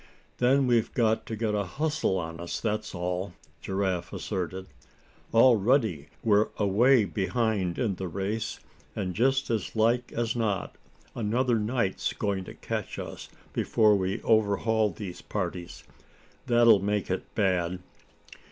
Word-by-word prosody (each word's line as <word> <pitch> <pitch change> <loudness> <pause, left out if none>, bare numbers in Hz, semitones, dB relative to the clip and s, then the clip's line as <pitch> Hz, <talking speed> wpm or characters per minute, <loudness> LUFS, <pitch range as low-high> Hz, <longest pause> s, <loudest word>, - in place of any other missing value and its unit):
"Then 135 +2 +4
we've 120 -2 +2
got 110 -2 +1
to 110 - -3
get 110 -1 -1
a 105 -1 +1
hustle 140 - -1
on 80 -1 -5
us, 85 0 -4
that's 110 -2 -2
all," 90 +1 -3 0.3
Giraffe 95 -2 -2
asserted. 95 +1 -4 0.7
"Already 115 - +4 0.2
we're 105 -1 +3
away 110 +4 +4
behind 100 -2 -1
in 115 -6 0
the 95 0 -5
race, 100 +5 -3 0.4
and 95 -3 -2
just 135 +5 +1
as 110 -2 -2
like 115 +3 +2
as 115 0 -1
not 105 -5 -1 0.4
another 120 +2 +1
night's 110 -2 -1
going 100 -3 -2
to - - -10
catch - - -4
us - - -7 0.2
before 110 -2 +3
we 95 0 -2
overhaul 110 0 +2
these 90 -1 -7
parties. 90 -3 -5 0.6
That'll 120 -3 +6
make 100 0 -1
it 95 - -4
bad." 90 -3 +1
105 Hz, 135 wpm, -28 LUFS, 95-115 Hz, 0.7 s, That'll